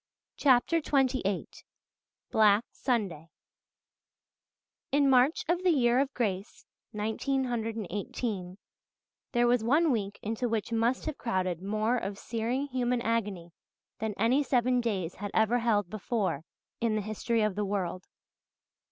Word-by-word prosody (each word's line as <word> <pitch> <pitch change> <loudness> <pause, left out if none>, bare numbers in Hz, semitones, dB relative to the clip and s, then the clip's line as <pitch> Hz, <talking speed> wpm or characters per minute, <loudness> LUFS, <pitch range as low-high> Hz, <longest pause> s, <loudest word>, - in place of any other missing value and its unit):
CHAPTER 270 +4 +4
XXVIII 260 - +1 0.8
BLACK 215 0 +4
SUNDAY 195 - -2 1.6
In 280 0 +4
March 265 +3 +4
of 345 +2 +1
the 370 - +3
year 250 -6 +3
of 275 0 +1
grace 200 -4 -3 0.3
1918 220 -4 -2 0.8
there 240 -1 +3
was 240 -1 +3
one 295 +7 +3
week 205 -4 -2
into 225 +3 -2
which 225 0 -2
must 230 +3 +1
have 310 -2 -4
crowded 185 -6 -1
more 215 +5 0
of 200 -3 -4
searing 235 +6 -2
human 250 -2 0
agony 205 -7 -2 0.5
than 220 -2 -2
any 240 +6 +3
seven 250 -2 +2
days 190 -7 -2
had 205 +1 -4
ever 220 +2 +3
held 215 -5 +1
before 200 - -2 0.3
in 225 -2 +1
the 215 - 0
history 220 +2 0
of 215 -2 +1
the 210 +2 -2
world. 185 -3 -3
225 Hz, 125 wpm, -29 LUFS, 205-250 Hz, 1.6 s, CHAPTER